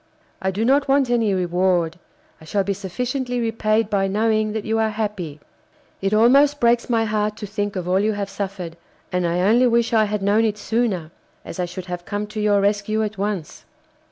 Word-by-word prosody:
I 190 - 0
do 205 +4 -1
not 275 +3 +3
want 270 -2 +3
any 230 -4 +2
reward. 180 -2 +1 0.4
I - - -13
shall 200 +4 0
be 200 +1 -1
sufficiently 245 +6 -3
repaid 225 -1 +1
by 200 -2 +1
knowing 215 +1 +1
that 220 -1 -3
you 225 0 0
are 220 0 +2
happy. 205 -8 -4 0.6
It 195 0 0
almost 275 +7 +5
breaks 235 0 +2
my 225 -2 +2
heart 210 0 -1
to 215 - -6
think 205 0 -3
of 180 -2 -3
all 185 +1 +2
you 215 +2 +1
have 205 -1 -3
suffered, 195 -4 -5 0.3
and 180 -1 0
I 175 +1 0
only 230 +6 +4
wish 235 0 +2
I 220 -1 +4
had 210 -1 -2
known 205 +3 +3
it 215 -2 0
sooner, 205 -7 -1 0.3
as 170 - -8
I 180 - +1
should 180 +1 -7
have 180 -1 -5
come 205 +3 -3
to 215 - -3
your 205 -1 +3
rescue 210 +2 +1
at 210 -2 -4
once. 200 -6 -3
210 Hz, 205 wpm, -22 LUFS, 190-225 Hz, 0.6 s, almost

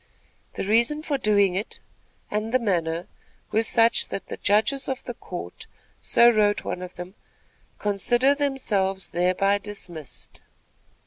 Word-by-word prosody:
The - - -3
reason 235 +9 +2
for 285 -3 -1
doing 205 -4 +3
it 200 +5 -4 0.5
and 215 +2 -2
the 255 - +4
manner 175 -7 -1 0.5
were 220 - +3
such, 230 0 +3
that 195 - -6
the - - -5
judges 220 +7 +2
of 265 -1 -3
the 245 - -5
court, 175 - -8 0.3
so 235 - +5
wrote 210 -2 +2
one 180 - -4
of 180 0 -8
them, 180 +1 -8 0.6
"consider 240 +6 +2
themselves 215 -10 -1
thereby 185 +3 +2
dismissed." 175 -9 -10
205 Hz, 135 wpm, -24 LUFS, 185-235 Hz, 0.6 s, so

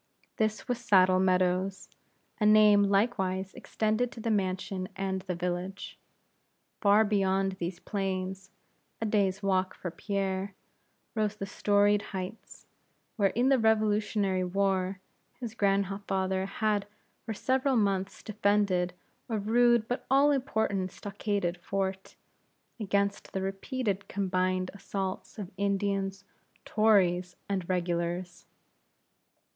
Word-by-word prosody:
This 215 -1 -1
was 245 -1 -1
Saddle 185 -5 +4
Meadows, 185 +1 +1 0.5
a 210 - +2
name 210 -1 +7
likewise 195 -2 0
extended 220 +3 -1
to - - -10
the 225 0 -1
mansion 190 -1 -1
and 190 -1 -2
the 185 -1 -4
village. 180 +2 -4 0.8
Far 210 +1 +5
beyond 195 -2 +1
these 175 +1 -4
plains, 190 -1 -3 0.5
a 225 - -2
day's 205 -2 +1
walk 190 -1 +1
for 175 - -5
Pierre, 195 +1 -2 0.6
rose 215 -2 0
the 195 - -5
storied 205 +1 +2 0.2
heights, 185 +4 -8 0.5
where 200 -3 +3
in 245 +6 +1
the 270 -2 +4
Revolutionary 210 -3 +2
War 190 0 0 0.4
his 235 -4 -5
grandfather 195 -2 0
had 205 0 0 0.4
for 220 - -4
several 265 +4 +1
months 195 -3 0
defended 200 -4 +1 0.4
a 225 - 0
rude 235 +2 +3
but 245 +1 -3
all 275 +2 +5
important 220 -8 0
stockaded 200 -3 -3
fort, 190 0 -3 0.6
against 200 -1 -1
the 190 - -1
repeated 200 +1 -3
combined 185 -1 0
assaults 195 0 -5
of 200 -4 -6
Indians, 195 0 -1 0.4
Tories, 185 -5 +3
and 190 -3 -2
Regulars. 175 0 -2
195 Hz, 115 wpm, -29 LUFS, 185-210 Hz, 0.8 s, name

